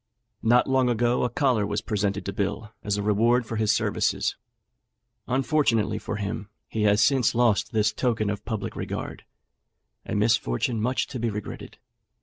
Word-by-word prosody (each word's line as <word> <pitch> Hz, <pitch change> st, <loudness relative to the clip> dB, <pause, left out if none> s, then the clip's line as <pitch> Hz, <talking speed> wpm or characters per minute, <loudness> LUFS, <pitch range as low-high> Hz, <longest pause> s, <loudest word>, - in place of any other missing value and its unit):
Not 120 Hz, +2 st, +4 dB
long 130 Hz, -2 st, +3 dB
ago 120 Hz, +1 st, +1 dB
a 125 Hz, -, +1 dB
collar 130 Hz, -9 st, +1 dB
was 100 Hz, 0 st, -1 dB
presented 100 Hz, -1 st, -1 dB
to 100 Hz, -, -3 dB
Bill 105 Hz, +2 st, -3 dB
as 105 Hz, -1 st, -1 dB
a 100 Hz, -, -2 dB
reward 115 Hz, +4 st, +3 dB
for 110 Hz, 0 st, -4 dB
his 110 Hz, -1 st, +2 dB
services; -, -, 0 dB, 0.9 s
unfortunately 125 Hz, -6 st, +1 dB
for 105 Hz, -, -4 dB
him, 105 Hz, 0 st, -4 dB, 0.2 s
he 110 Hz, -, -3 dB
has 105 Hz, 0 st, +4 dB
since 135 Hz, -5 st, +3 dB
lost 115 Hz, -4 st, +2 dB
this 105 Hz, -2 st, +2 dB
token 110 Hz, -4 st, 0 dB
of 105 Hz, -, -5 dB
public 110 Hz, -4 st, -4 dB
regard -, -, -5 dB, 0.8 s
a -, -, -4 dB
misfortune 110 Hz, -, +1 dB
much 125 Hz, +4 st, 0 dB
to 130 Hz, -, -7 dB
be 115 Hz, 0 st, 0 dB
regretted. 105 Hz, -1 st, -7 dB
110 Hz, 160 wpm, -25 LUFS, 105-120 Hz, 0.9 s, Not